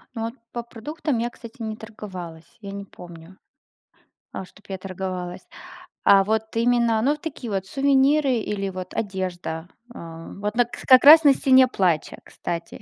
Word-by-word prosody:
Ну, 225 - -4
вот 230 +1 -3 0.2
по 240 -1 -4
продуктам 270 +4 -4
я, 240 +1 -1
кстати, 235 +1 -13
не 220 -1 -4
торговалась, 185 -7 -10
я 200 -1 -7
не 200 0 -7
помню, 175 0 -13 1.0
а, 190 - -5
что 200 - -19
б - - -23
я 190 -1 -5
торговалась. 185 -1 -5 0.6
А 195 -1 +6
вот 220 +1 +1
именно, 235 -2 +2
ну, 285 +5 +2
такие 295 -6 -7
вот 190 -1 -2
сувениры 275 +3 +3
или 205 -3 -2
вот 185 -1 -7
одежда. 180 -5 -4 0.2
А, 165 -5 -10
вот 210 +2 -4
на 245 -1 +4
к 240 - -9
как 255 +1 +7
раз 315 +2 +10
на 280 -2 +7
Стене 260 -1 +5
Плача, 180 -9 0
кстати. 170 0 -6
210 Hz, 170 wpm, -23 LUFS, 185-245 Hz, 1.0 s, раз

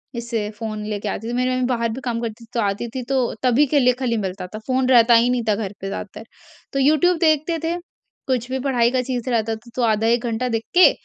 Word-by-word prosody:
इससे 230 -3 -3
फ़ोन 215 0 -5
लेके 210 0 -3
आती 225 +3 -4
थी। - - -3
मेरी 250 +1 +1
मम्मी 255 0 0
बाहर 235 -2 0
भी 265 - -7
काम 235 -2 -2
करती 230 0 -5
थी, - - -15
तो 235 - -1
आती 205 +3 -1
थी 255 - -3
तो 260 -3 +1
तभी 255 +4 +4
के 290 - +5
लिए 250 -1 +4
खाली 235 -3 0
मिलता 190 -2 -4
था, 215 +3 -8
फ़ोन 260 0 +1
रहता 240 -1 +6
ही 235 +2 +4
नहीं 245 -2 0
था 205 - +3
घर 205 -2 -4
पे 195 - -4
ज़्यादातर। 200 +2 -6 0.5
तो 275 - 0
यूट्यूब 310 +5 +4
देखते 315 +1 +2
थे, 335 +1 0 0.5
कुछ 250 -1 -1
भी 265 - -1
पढ़ाई 245 -3 +2
का 255 -1 +1
चीज़ 255 -1 -3
रहता 225 -2 0
था 235 +2 -15
तो 255 - -1
आधा 220 0 +2
1 235 +1 +2
घंटा 235 +2 -1
देख 225 -1 -1
के, 365 - +8
235 Hz, 255 wpm, -21 LUFS, 225-255 Hz, 0.5 s, के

